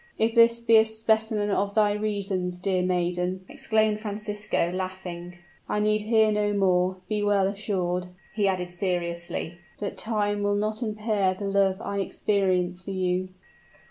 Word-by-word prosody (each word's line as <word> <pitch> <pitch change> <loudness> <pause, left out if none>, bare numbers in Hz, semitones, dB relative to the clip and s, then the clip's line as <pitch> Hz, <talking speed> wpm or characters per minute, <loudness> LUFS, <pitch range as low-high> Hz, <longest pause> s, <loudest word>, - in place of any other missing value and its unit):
"If 225 +1 +2
this 230 0 +5
be 230 -1 +5
a 220 - +7
specimen 220 -1 0
of 200 +1 0
thy 210 -2 +4
reasons, 200 -4 -2
dear 185 0 0
maiden," 180 +1 -1
exclaimed 220 -6 +1
Francisco, 210 -4 -1
laughing, 180 -1 -6 0.3
"I 210 - 0
need 215 0 +2
hear 220 0 +3
no 210 0 +1
more. 185 -2 +2
Be 210 -1 -1
well 205 -2 +3
assured," 185 -3 -2 0.3
he 210 -2 +1
added 180 -2 -1
seriously, 175 -2 -2 0.2
"that 205 - -4
time 205 -2 -1
will 205 0 +1
not 215 +2 -1
impair 210 -4 0
the 200 - -5
love 195 -1 +2
I 200 - -3
experience 185 -3 0
for 185 - -9
you." 185 -1 -1
200 Hz, 150 wpm, -26 LUFS, 185-215 Hz, 0.3 s, a